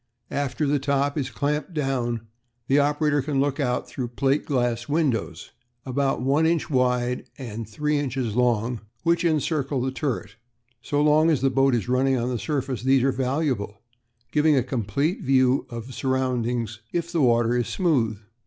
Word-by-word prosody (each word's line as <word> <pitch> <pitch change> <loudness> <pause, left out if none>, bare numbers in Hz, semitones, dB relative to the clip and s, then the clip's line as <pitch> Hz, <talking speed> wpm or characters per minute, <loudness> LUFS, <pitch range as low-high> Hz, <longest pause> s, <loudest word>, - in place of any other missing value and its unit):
After 140 +1 -1
the 145 0 +2
top 140 +1 0
is 135 -4 -2
clamped 150 +6 -2
down 125 -5 -1 0.4
the 135 +3 +3
operator 145 0 +2
can 140 0 -1
look 140 +1 0
out 125 -3 0
through 125 -3 -4
plate 135 +4 0
glass 120 -3 0
windows, 135 - -1 0.3
about 135 -1 0
one 145 +5 +3
inch 165 -2 0
wide 125 -1 +1
and 115 -4 -6
three 150 +6 0
inches 130 -5 -2
long, 120 -1 +1 0.2
which 170 +1 +2
encircle 150 -4 0
the 130 +1 -1
turret. 130 -5 -3 0.4
"So 145 +3 0
long 155 +2 +4
as 150 -6 +2
the 135 0 +2
boat 135 0 +3
is 115 - -2
running 130 +1 +2
on 120 +1 -1
the 125 -2 -2
surface 130 -1 -2
these 130 0 +3
are 135 - +3
valuable, 130 -6 -1 0.5
giving 150 0 +4
a 130 - +3
complete 135 - -1
view 130 0 +2
of 115 -1 -6
the 130 - -10
surroundings 125 -4 -1
if 170 -1 -2
the 170 -3 +1
water 120 -2 +3
is 120 -1 0
smooth. 130 - +1
135 Hz, 170 wpm, -24 LUFS, 120-145 Hz, 0.5 s, long